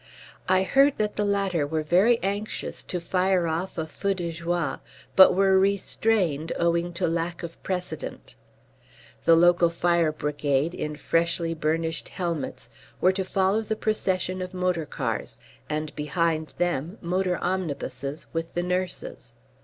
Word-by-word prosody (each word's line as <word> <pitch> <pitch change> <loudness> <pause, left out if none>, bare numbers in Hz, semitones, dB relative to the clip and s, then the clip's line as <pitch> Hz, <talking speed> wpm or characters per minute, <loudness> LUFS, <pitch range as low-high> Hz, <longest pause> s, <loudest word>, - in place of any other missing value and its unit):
I 185 0 +4
heard 275 +7 +4
that 210 -1 -1
the 210 - 0
latter 195 -7 +1
were 155 +1 -1
very 190 +10 +4
anxious 200 +2 -3
to 180 - -3
fire 180 +1 +1
off 165 +4 -3
a 160 - -1
feu 195 +5 -2
de 175 -2 -3
joie, 170 +1 -2 0.4
but 190 -1 +8
were 190 0 +4
restrained 195 -4 +1
owing 170 +1 +1
to 175 +1 0
lack 170 +1 -2
of 170 -1 -8
precedent. 180 -4 -5 0.9
The 165 - +7
local 175 0 +5
fire 170 -1 +2
brigade 150 0 0
in 150 -3 -4
freshly 170 +2 0
burnished 160 +1 -1
helmets 165 - -4 0.3
were 185 - +5
to 190 0 -2
follow 190 +3 +1
the 220 0 -2
procession 185 -4 -1
of 185 +1 -6
motor 180 -4 0
cars, 115 -4 -4 0.3
and 155 0 -3
behind 155 +1 -1
them 175 +1 -1
motor 180 0 0
omnibuses 150 -5 -3
with 165 0 -4
the 175 - 0
nurses. 180 -9 -3
175 Hz, 145 wpm, -26 LUFS, 160-190 Hz, 0.9 s, but